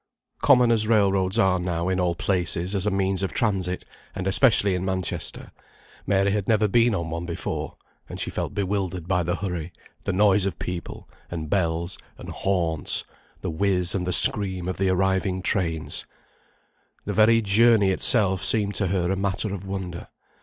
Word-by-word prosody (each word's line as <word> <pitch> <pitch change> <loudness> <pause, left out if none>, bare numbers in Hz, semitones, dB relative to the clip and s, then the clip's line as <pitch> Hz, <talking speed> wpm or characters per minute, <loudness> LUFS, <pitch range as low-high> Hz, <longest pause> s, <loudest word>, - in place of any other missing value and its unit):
Common 125 -4 +4
as 110 -2 +2
railroads 100 -2 +2
are 95 -5 +2
now 85 -1 -3
in 95 0 -1
all 90 -1 0
places 90 0 -1
as 100 0 -1
a - - +3
means 95 -1 -1
of 95 - -3
transit, 95 -5 -1 0.3
and 95 - -4
especially 100 -1 +4
in 90 0 -2
Manchester, 95 -1 -4 0.6
Mary 100 0 +2
had 105 -1 -2
never 110 -1 +2
been 115 +2 +2
on 85 -3 -4
one 85 +1 -5
before; 85 - -5 0.3
and - - -8
she - - -3
felt - - -4
bewildered 95 -3 -3
by 95 -2 +1
the 85 +1 -2
hurry, 90 -4 -5 0.3
the - - 0
noise 100 0 +3
of 100 - -5
people, 90 -1 -7 0.2
and 80 -3 -6
bells, 85 -1 -1 0.2
and - - -10
horns; 85 -5 0 0.4
the - - -3
whiz 90 +1 +1
and 90 -2 -3
the - - 0
scream 95 -1 +4
of 95 - -3
the 95 0 0
arriving 95 0 0
trains. 85 -5 -1 1.0
The - - -3
very 110 +2 +4
journey 105 -1 +4
itself 95 -1 +5
seemed 105 -2 +1
to 100 - 0
her 90 -1 -1
a - - 0
matter 100 +1 -2
of 95 0 -7
wonder. 95 -3 -6
95 Hz, 175 wpm, -24 LUFS, 90-100 Hz, 1.0 s, itself